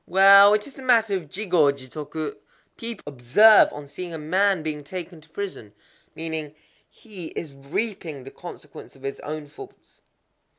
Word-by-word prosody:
"Well, 200 +2 +8
it 210 - -2
is 275 - -13
a - - -8
matter 230 -5 +3
of 170 -6 -5
Jigō 175 -7 +2
jitoku," 150 +3 -6 0.4
people 230 -2 -7
will 145 - -7
observe 175 - +6
on 145 0 -8
seeing 170 +4 -7
a - - -4
man 185 +3 +1
being 150 -2 -4
taken 175 +1 -8
to 160 - -21
prison; 160 - -7 0.4
meaning, 160 -2 -5 0.3
"He 195 -7 -10
is 155 -4 -6
reaping 150 - -4
the 135 - -10
consequence 150 -6 -11
of 135 - -19
his 135 0 -5
own 155 0 -6
faults." 145 +1 -15
160 Hz, 165 wpm, -24 LUFS, 145-200 Hz, 0.4 s, Well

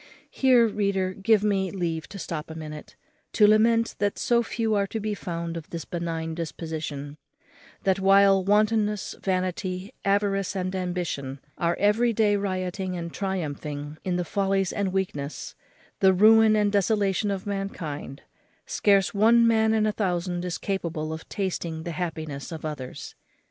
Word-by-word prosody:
Here, 255 -3 +5
reader, 200 -3 0
give 205 +2 +2
me 195 -2 +1
leave 170 -4 -3
to 200 - -8
stop 165 -4 -5
a 160 - -7
minute, 155 -1 -8 0.4
to 210 - +5
lament 230 +2 +4
that 205 -1 0
so 235 -1 +2
few 225 -1 -1
are 200 -1 +1
to 220 - -4
be 215 0 -2
found 170 -4 -4
of 165 -2 -7
this 165 -1 -6
benign 165 -2 -3
disposition; 155 -2 -5 0.7
that, 190 0 +2
while 195 0 +5
wantonness, 210 0 +1
vanity, 185 +2 -2
avarice, 200 0 +1
and 185 0 -2
ambition 175 -7 -3 0.2
are 170 0 +1
every 225 +4 +3
day 210 -1 +3
rioting 185 -1 -2
and 170 -1 -6
triumphing 150 -5 -4
in 185 -1 -1
the 180 0 -1
follies 195 0 0
and 200 -2 -1
weakness, 155 -7 -3 0.5
the 190 -1 +5
ruin 220 +3 +6
and 210 -1 +2
desolation 205 0 +1
of 195 -2 -3
mankind, 175 -9 -5 0.4
scarce 200 0 +2
one 230 +3 +5
man 220 -1 +3
in 220 -1 +2
a 215 - +2
thousand 180 -3 -2
is 180 -1 -3
capable 165 -5 -3
of 160 - -9
tasting 170 -5 -3
the 170 - -4
happiness 160 -3 -5
of 160 -1 -6
others. 145 -5 -6
190 Hz, 155 wpm, -26 LUFS, 165-205 Hz, 0.7 s, ruin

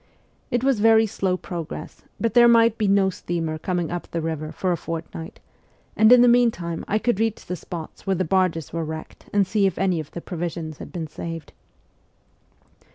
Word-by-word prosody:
It 245 0 0
was 265 -4 +2
very 225 +1 +5
slow 190 -3 -1
progress, 170 -3 -7 0.2
but 230 -2 0
there 240 0 +7
might 230 -1 +5
be 215 -2 0
no 195 -1 +3
steamer 165 -3 -3
coming 175 -1 -2
up 175 0 -5
the 170 - -3
river 160 -1 -3
for 185 - -1
a - - +2
fort 165 -1 -5
night, 165 0 -8 0.6
and 220 +2 +6
in 250 -1 +8
the - - +6
meantime 230 -9 +2
I 210 - +1
could 220 -2 0
reach 225 -1 -1
the 180 - -3
spots 170 +2 -8
where 190 - +2
the 185 +1 0
barges 180 -3 0
were 165 -1 -1
wrecked 160 0 -8
and 200 -1 +3
see 200 +1 +2
if 190 - -3
any 185 -3 +1
of 155 -2 -6
the 170 - -7
provisions 165 -3 -5
had - - -9
been 170 -3 -4
saved. 165 +1 -7
180 Hz, 200 wpm, -23 LUFS, 165-215 Hz, 0.6 s, in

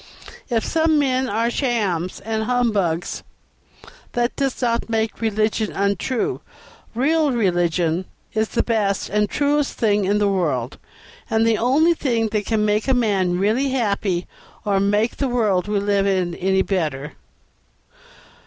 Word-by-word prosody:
If 230 -3 0
some 320 -1 +2
men 260 -2 +1
are 230 +3 0
shams 205 - -1
and 220 +1 -2
humbugs, 210 -9 0 0.9
that 240 0 0
does 270 -2 -1
not 235 -2 0
make 225 0 -1
religion 215 0 0
untrue. 200 +5 -1 0.5
Real 300 +4 +2
religion 175 -5 +1 0.3
is 220 0 +1
the - - 0
best 210 -4 0
and 210 0 +1
truest 290 0 +1
thing 210 -4 +2
in 200 +2 +2
the 205 -1 +2
world, 150 -11 -1 0.5
and 225 -1 +2
the 225 -2 +2
only 290 +8 +3
thing 235 -8 0
that 210 -1 -2
can 215 -2 +1
make 210 +2 +1
a 265 - +3
man 195 -7 +1
really 220 +8 +1
happy 200 -8 0 0.4
or 200 -2 +2
make 205 +3 +1
the 275 - 0
world 210 -7 +1
we 210 0 0
live 200 0 +1
in 185 -3 0
any 190 +2 +1
better." 150 -7 -2
215 Hz, 145 wpm, -21 LUFS, 195-240 Hz, 0.9 s, only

